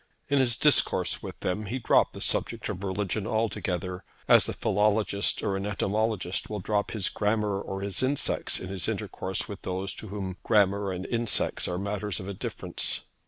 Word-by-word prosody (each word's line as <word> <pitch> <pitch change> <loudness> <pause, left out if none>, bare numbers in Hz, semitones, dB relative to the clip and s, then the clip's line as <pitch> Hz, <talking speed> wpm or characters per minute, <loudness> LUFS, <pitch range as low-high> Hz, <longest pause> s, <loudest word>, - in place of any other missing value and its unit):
In 140 0 +4
his 120 -3 +2
intercourse 150 +2 +4
with - - -7
them 105 +3 -1
he 120 +6 -2
dropped 125 - +3
the - - -8
subject - - -1
of 95 - -4
religion 100 +2 -1
altogether, 95 -4 -1 0.2
as - - +6
a - - -1
philologist 105 0 +1
or 100 -3 0
an 95 +1 -2
entomologist 105 -2 0
will 105 -1 -3
drop 100 +2 0
his 105 -4 -1
grammar 105 -1 0
or 95 -1 -5
his 100 +2 -1
insects 135 +2 +1
in 95 - -6
his 95 -2 -2
intercourse 95 0 -2
with 100 -2 -7
those 95 +1 -3
to 110 - -8
whom 95 -2 -4
grammar 100 -2 +3
and 90 0 -4
insects 115 -2 0
are 90 - -2
matters 100 0 -2
of 95 - -7
indifference. 100 -2 -2
100 Hz, 175 wpm, -28 LUFS, 95-110 Hz, 0.2 s, as